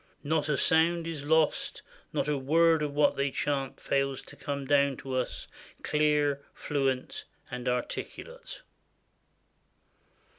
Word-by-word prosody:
Not 155 0 0
a 145 - +2
sound 165 +1 +3
is 160 -4 -5
lost; 160 0 +1 0.3
not - - -1
a 150 - +1
word 160 +4 +4
of 145 -1 -2
what 150 0 +4
they 140 +1 +1
chant 135 -1 -2
fails 135 -1 0
to - - -14
come 140 -1 -4
down 140 -1 +3
to 135 0 -6
us, 130 -1 -2 0.4
clear, 150 -2 +2
fluent, 135 -3 -1 0.3
and 125 0 -5
articulate." 480 - -5
145 Hz, 125 wpm, -29 LUFS, 135-155 Hz, 0.4 s, word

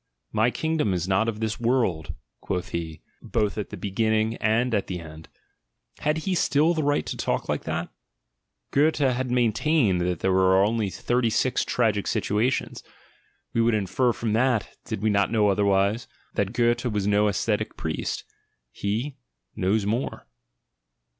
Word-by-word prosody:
"My 110 +2 +3
kingdom 155 -9 0
is 90 0 -2
not 95 +4 +2
of 110 -2 -5
this 110 -1 -2
world," 95 - 0 0.2
quoth 90 -2 -3
he, 80 -2 -5 0.2
both 105 -3 -1
at 105 - -4
the - - -7
be 100 - -5
ginning 110 +2 +1
and 115 +3 +2
at 100 -3 0
the 90 -2 -4
end: 80 -1 -11 0.7
had 150 +1 0
he 190 - +1
still 160 -1 +3
the 160 - -1
right 145 0 +1
to - - -4
talk - - -2
like - - -2
that? 80 +2 -2 0.4
— - - -54
Goethe 150 +3 +3
has 130 -2 +1
maintained 120 - +2
that 90 -1 -1
there 95 - +2
are 95 +1 +4
only 110 -1 0
thirty 120 +4 0
six 125 +3 +1
tragic 110 -4 0
situations: 115 +6 0 0.7
we 115 - +2
would 115 -1 +3
infer 110 +5 +1
from 115 -2 -2
that, 120 -1 +1
did 100 - -4
we 110 - +3
not 100 0 +2
know 105 -3 +3
otherwise, 100 +3 +2 0.3
that 100 -1 0
Goethe 120 +1 +2
was 105 -5 -1
no 105 +1 +3
ascetic 100 - -1
priest. - - -3 0.5
He 115 - -3 0.2
— - - -56
knows 100 +1 +1
more. 115 +6 -2
110 Hz, 165 wpm, -25 LUFS, 95-120 Hz, 0.7 s, are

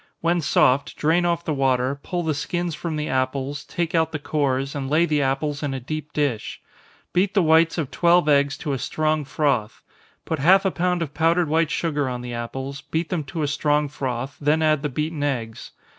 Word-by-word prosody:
When 170 +1 +1
soft, 140 -1 +2
drain 165 +3 +2
off 170 0 -1
the 155 - 0
water, 135 0 +1
pull 175 +2 -3
the 160 -1 0
skins 175 +4 -2
from 160 +1 -4
the 150 0 -2
apples, 130 +2 -2
take 170 0 -3
out 160 -1 +2
the 155 - -2
cores, 140 -2 -1
and 135 -2 -4
lay 155 +4 +4
the 150 -3 +1
apples 140 +2 -1
in 140 -3 -2
a - - -3
deep 150 +4 -6
dish. 140 -8 -2 0.5
Beat 190 +3 +1
the 195 - +4
whites 160 +1 +4
of 150 -6 -2
twelve 175 -2 +3
eggs 145 -1 +3
to 145 - 0
a 135 - -2
strong 155 +3 0
froth 135 -7 -1 0.4
put 160 - -2
half 190 +7 +5
a 190 - +2
pound 180 -1 0
of 150 -3 -7
powdered 165 +1 +2
white 160 0 +2
sugar 150 -4 -1
on 125 -1 -4
the 125 0 -6
apples, 135 +4 -5
beat 160 +1 -3
them 175 -5 -1
to 155 +3 -4
a - - +1
strong 150 +1 +1
froth, 130 -2 -4
then 150 +2 +2
add 155 -2 +3
the 150 - -2
beaten 150 +3 -3
eggs. 120 -6 -3
150 Hz, 210 wpm, -23 LUFS, 135-165 Hz, 0.5 s, half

